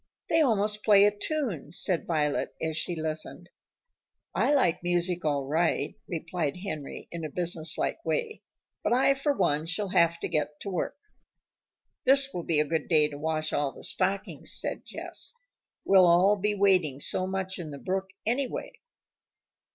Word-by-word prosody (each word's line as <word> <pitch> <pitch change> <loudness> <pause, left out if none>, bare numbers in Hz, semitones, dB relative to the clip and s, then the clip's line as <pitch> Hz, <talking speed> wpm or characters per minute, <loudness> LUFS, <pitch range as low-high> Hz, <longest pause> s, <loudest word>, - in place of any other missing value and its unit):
"They 325 - +4
almost 210 -5 +1
play 205 -2 +6
a 205 0 +2
tune," 230 - -2
said 175 +1 0
Violet, 150 -3 0
as 160 -1 -2
she 175 +2 -1
listened. 155 -1 -4 0.8
"I - - +2
like 185 - +3
music 175 0 0
all 145 -3 0
right," 160 +4 0
replied 165 -2 -3
Henry 155 -7 -6
in 170 -1 -5
a 155 - -3
business 170 0 0
like - - -2
way, 460 -2 -2 0.4
"but - - +2
I 265 +2 +4
for 275 +2 0
one 155 - 0
shall 190 +3 -2
have 170 -2 +3
to - - -1
get 150 -1 -2
to 200 - -5
work." 180 - -3 1.1
"This 275 +1 +4
will 175 - -3
be 165 -2 +1
a 150 - +3
good 160 0 -2
day 155 -3 +4
to 145 -1 -8
wash 155 0 -1
all 145 -1 0
the - - -12
stockings," 190 +1 -1
said - - -4
Jess. - - -5 0.5
"We'll 190 -2 +6
all 180 +4 +5
be 210 +1 0
wading 180 -9 +2
so 185 +5 0
much 190 0 -3
in 165 -3 -6
the 140 - -7
brook, 190 +5 -2 0.2
anyway." 265 - -2
175 Hz, 165 wpm, -28 LUFS, 155-205 Hz, 1.1 s, play